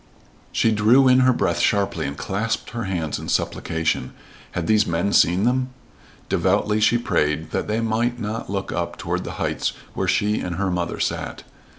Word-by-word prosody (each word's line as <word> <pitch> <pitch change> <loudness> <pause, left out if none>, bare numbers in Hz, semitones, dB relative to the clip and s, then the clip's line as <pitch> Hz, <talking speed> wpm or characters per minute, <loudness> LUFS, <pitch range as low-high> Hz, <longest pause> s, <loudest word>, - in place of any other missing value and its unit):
She 115 - +2
drew 115 +5 +5
in 130 0 +6
her 130 0 +5
breath 120 - 0
sharply 100 -7 +1
and 70 - -6
clasped 105 +4 -2
her 115 -2 -4
hands 85 -5 -2
in - - -7
supplication. 80 -5 -1 0.4
Had 90 - -2
those 105 +3 +3
men 85 +4 0
seen 90 +4 +4
them? 130 +2 +1 0.6
Devoutly 105 0 +1
she 115 +2 +4
prayed 75 -8 0
that - - -2
they 110 +2 0
might 115 +2 0
not 110 -1 -4
look 95 0 -3
up - - -3
toward - - -2
the - - -6
heights - - -1 0.2
where 95 - -2
she 105 +4 +1
and 90 -1 -3
her 95 +1 -1
mother 90 -1 -2
sat. - - -3
105 Hz, 180 wpm, -22 LUFS, 90-115 Hz, 0.6 s, in